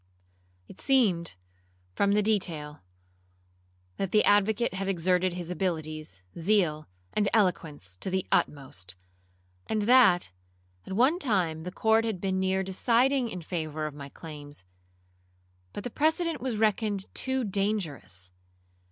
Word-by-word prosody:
It - - -12
seemed, 200 - +2 0.6
from 200 - +2
the 210 0 +3
detail, 165 -8 0 1.2
that 195 - -2
the 210 - +4
advocate 205 +3 +3
had 190 +1 -3
exerted 180 0 +1
his 175 -1 -5
abilities, 155 - -3
zeal, 165 -4 +1 0.3
and 205 -1 +2
eloquence 155 - 0
to 190 - -4
the 190 0 -1
utmost; 95 - -1 0.7
and 215 -1 0
that, 210 - +5 0.6
at - - -5
one 260 - +3
time, 180 - 0
the 180 - -4
court 220 +3 +3
had 220 -5 -2
been 190 0 -1
near 190 0 +1
deciding 240 +6 +2
in 180 -5 -6
favour 155 -2 -3
of 155 - -4
my 140 -1 -9
claims, 145 - -10 1.1
but 200 - -6
the 245 - -5
precedent 320 +1 +1
was 250 -4 -2
reckoned 210 -2 +1
too 260 -1 0
dangerous. 165 - -2
190 Hz, 130 wpm, -28 LUFS, 155-220 Hz, 1.2 s, that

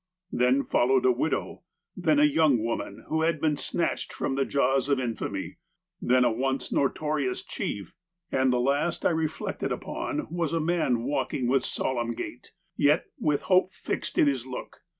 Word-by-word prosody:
Then 125 +3 +3
followed 130 +1 +2
a 130 - +6
widow, 130 +6 -2 0.3
then 160 -5 +2
a - - +6
young 150 -2 +4
woman, 115 0 -4
who 160 0 0
had 160 -1 +1
been 155 -1 +2
snatched 170 +3 -2
from - - -2
the 135 0 +1
jaws 135 0 +1
of 140 -2 +3
infamy; 115 -5 -4 0.4
then 125 0 +4
a - - +3
once 135 +3 -1
notorious 145 -1 0
chief; 100 -4 -4 0.4
and 130 -1 +3
the 125 - +2
last 140 +6 0
I - - +5
reflected 160 -1 -2
upon 305 -1 -3
was 170 -2 -1
a 165 - +2
man 155 -8 +1
walking 130 -1 -1
with 130 +1 +2
solemn 120 -3 -1
gait, - - -7 0.2
yet 150 +3 +3
with 150 -2 +1
hope 185 -1 +3
fixed - - -4
in - - +6
his 135 -3 0
look. 125 - -7
140 Hz, 170 wpm, -27 LUFS, 125-155 Hz, 0.4 s, a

